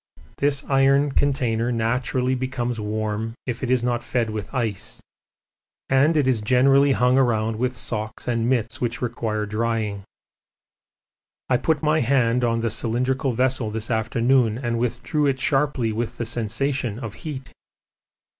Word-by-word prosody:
This 140 Hz, 0 st, +1 dB
iron 135 Hz, +1 st, +3 dB
container 125 Hz, -5 st, +1 dB
naturally 125 Hz, +2 st, 0 dB
becomes 125 Hz, -2 st, -2 dB
warm 110 Hz, +1 st, -3 dB
if 125 Hz, -2 st, -4 dB
it 130 Hz, -, -2 dB
is 125 Hz, -2 st, +2 dB
not 120 Hz, -1 st, 0 dB
fed 120 Hz, -2 st, -1 dB
with 105 Hz, -2 st, -5 dB
ice, 115 Hz, -7 st, -3 dB, 0.9 s
and 140 Hz, +5 st, +4 dB
it 145 Hz, -3 st, +2 dB
is 125 Hz, -4 st, +2 dB
generally 135 Hz, +5 st, +4 dB
hung 125 Hz, +1 st, +3 dB
around 110 Hz, -3 st, +1 dB
with 125 Hz, +1 st, -1 dB
socks 110 Hz, -1 st, -4 dB
and 115 Hz, -1 st, 0 dB
mits 120 Hz, -3 st, -1 dB
which 120 Hz, 0 st, -1 dB
require 110 Hz, -3 st, -2 dB
drying. 105 Hz, -1 st, -2 dB, 1.5 s
I 125 Hz, -, +4 dB
put 155 Hz, +3 st, 0 dB
my 155 Hz, +1 st, +3 dB
hand 125 Hz, -2 st, +2 dB
on 115 Hz, -1 st, +1 dB
the 115 Hz, -1 st, 0 dB
cylindrical 125 Hz, +4 st, 0 dB
vessel 125 Hz, -1 st, +1 dB
this 110 Hz, +1 st, -4 dB
afternoon 115 Hz, +1 st, +2 dB
and 120 Hz, -2 st, -2 dB
withdrew 145 Hz, +5 st, 0 dB
it 135 Hz, -1 st, 0 dB
sharply 135 Hz, -5 st, +1 dB
with 120 Hz, +2 st, -3 dB
the 120 Hz, -, -3 dB
sensation 120 Hz, +1 st, -1 dB
of 115 Hz, -4 st, -6 dB
heat. 130 Hz, -4 st, -7 dB
120 Hz, 145 wpm, -23 LUFS, 115-130 Hz, 1.5 s, and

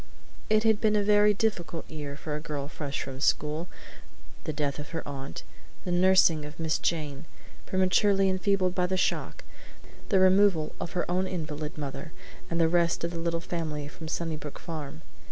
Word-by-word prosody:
It 215 Hz, 0 st, +4 dB
had 220 Hz, -2 st, +3 dB
been 215 Hz, -1 st, +3 dB
a 205 Hz, -, +3 dB
very 210 Hz, 0 st, +5 dB
difficult 195 Hz, -6 st, -1 dB
year 145 Hz, -2 st, -6 dB
for 150 Hz, 0 st, -4 dB
a -, -, -2 dB
girl 145 Hz, -3 st, -4 dB
fresh 145 Hz, -2 st, -4 dB
from 135 Hz, -1 st, -7 dB
school: 155 Hz, +3 st, +1 dB, 0.8 s
the -, -, -1 dB
death 145 Hz, -2 st, -2 dB
of 150 Hz, -, -7 dB
her -, -, -5 dB
aunt, 135 Hz, -10 st, -6 dB, 0.4 s
the 180 Hz, -, -1 dB
nursing 175 Hz, -3 st, +5 dB
of 150 Hz, +2 st, -9 dB
Miss 160 Hz, -1 st, 0 dB
Jane, 150 Hz, -3 st, -2 dB, 0.4 s
prematurely 195 Hz, +1 st, +3 dB
enfeebled 185 Hz, -1 st, +2 dB
by 180 Hz, -1 st, +1 dB
the 185 Hz, +1 st, 0 dB
shock, -, -, -1 dB, 0.7 s
the 195 Hz, -, +4 dB
removal 185 Hz, -4 st, +4 dB
of 170 Hz, -, -4 dB
her 175 Hz, -, 0 dB
own 185 Hz, +2 st, +1 dB
invalid 155 Hz, -4 st, -4 dB
mother 150 Hz, +2 st, -6 dB, 0.4 s
and 170 Hz, -, -1 dB
the 165 Hz, -, +5 dB
rest 170 Hz, 0 st, +2 dB
of 170 Hz, -, -1 dB
the 170 Hz, -, -4 dB
little 170 Hz, 0 st, 0 dB
family 155 Hz, -4 st, -3 dB
from 160 Hz, +2 st, -9 dB
Sunnybrook 155 Hz, -3 st, -4 dB
Farm. 155 Hz, -2 st, -7 dB
165 Hz, 175 wpm, -28 LUFS, 150-185 Hz, 0.8 s, very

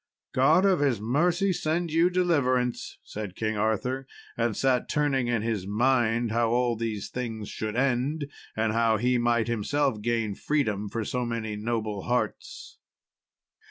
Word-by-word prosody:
"God 155 Hz, +9 st, +4 dB
of 190 Hz, -3 st, +4 dB
his 135 Hz, -7 st, +1 dB
mercy 175 Hz, -, +1 dB
send 165 Hz, +1 st, -1 dB
you 165 Hz, +3 st, +4 dB
deliverance," 140 Hz, -9 st, 0 dB
said 105 Hz, -3 st, -7 dB
King 110 Hz, -1 st, -1 dB
Arthur, 110 Hz, +5 st, -1 dB, 0.3 s
and 115 Hz, -2 st, 0 dB
sat 130 Hz, -2 st, +1 dB
turning 140 Hz, -4 st, +1 dB
in 120 Hz, -3 st, 0 dB
his 110 Hz, -5 st, -2 dB
mind 120 Hz, +1 st, +2 dB
how 115 Hz, 0 st, +2 dB
all 120 Hz, 0 st, +2 dB
these 110 Hz, -3 st, -3 dB
things 115 Hz, -4 st, -4 dB
should 110 Hz, 0 st, -4 dB
end, 135 Hz, +4 st, 0 dB, 0.3 s
and 110 Hz, 0 st, +1 dB
how 115 Hz, -1 st, +3 dB
he 125 Hz, +3 st, +2 dB
might 120 Hz, -1 st, +2 dB
himself 120 Hz, +1 st, 0 dB
gain 115 Hz, -2 st, 0 dB
freedom 105 Hz, -6 st, -1 dB
for 115 Hz, 0 st, -3 dB
so 125 Hz, +3 st, -2 dB
many 115 Hz, -2 st, -3 dB
noble 110 Hz, -2 st, -2 dB
hearts. 125 Hz, 0 st, -3 dB
120 Hz, 150 wpm, -27 LUFS, 110-135 Hz, 0.3 s, God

